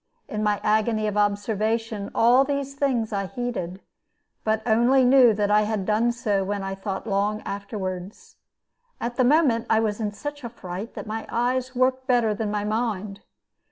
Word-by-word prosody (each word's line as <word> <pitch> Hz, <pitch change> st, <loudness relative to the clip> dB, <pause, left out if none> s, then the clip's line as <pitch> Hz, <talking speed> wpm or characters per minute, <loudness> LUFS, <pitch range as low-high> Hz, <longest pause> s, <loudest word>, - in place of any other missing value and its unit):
In 215 Hz, -, -4 dB
my 210 Hz, -1 st, +1 dB
agony 215 Hz, +1 st, +1 dB
of 210 Hz, -1 st, -1 dB
observation 210 Hz, +1 st, 0 dB
all 245 Hz, +4 st, +5 dB
these 280 Hz, 0 st, -3 dB
things 255 Hz, -6 st, 0 dB
I 195 Hz, -1 st, -1 dB
heeded, 195 Hz, -4 st, -4 dB, 0.6 s
but 220 Hz, 0 st, 0 dB
only 245 Hz, +4 st, +4 dB
knew 250 Hz, -2 st, +7 dB
that 205 Hz, 0 st, 0 dB
I 210 Hz, 0 st, +5 dB
had 210 Hz, -2 st, -1 dB
done 220 Hz, +3 st, +2 dB
so 210 Hz, -4 st, 0 dB
when 200 Hz, +1 st, -3 dB
I 195 Hz, 0 st, -3 dB
thought 195 Hz, 0 st, -5 dB
long 205 Hz, 0 st, 0 dB
afterward. 195 Hz, -2 st, -4 dB, 0.9 s
At 240 Hz, +1 st, -4 dB
the 255 Hz, -, +4 dB
moment 260 Hz, -4 st, +3 dB
I 220 Hz, -, +4 dB
was 215 Hz, -1 st, -1 dB
in 210 Hz, -2 st, -1 dB
such 290 Hz, +7 st, -7 dB
a 235 Hz, -, -4 dB
fright 190 Hz, -1 st, -7 dB
that -, -, -6 dB
my 220 Hz, +1 st, -5 dB
eyes 255 Hz, +2 st, -1 dB
worked 255 Hz, +1 st, +1 dB
better 240 Hz, -4 st, +3 dB
than 210 Hz, 0 st, -3 dB
my 205 Hz, 0 st, -1 dB
mind. 210 Hz, -2 st, -2 dB
220 Hz, 175 wpm, -24 LUFS, 205-245 Hz, 0.9 s, knew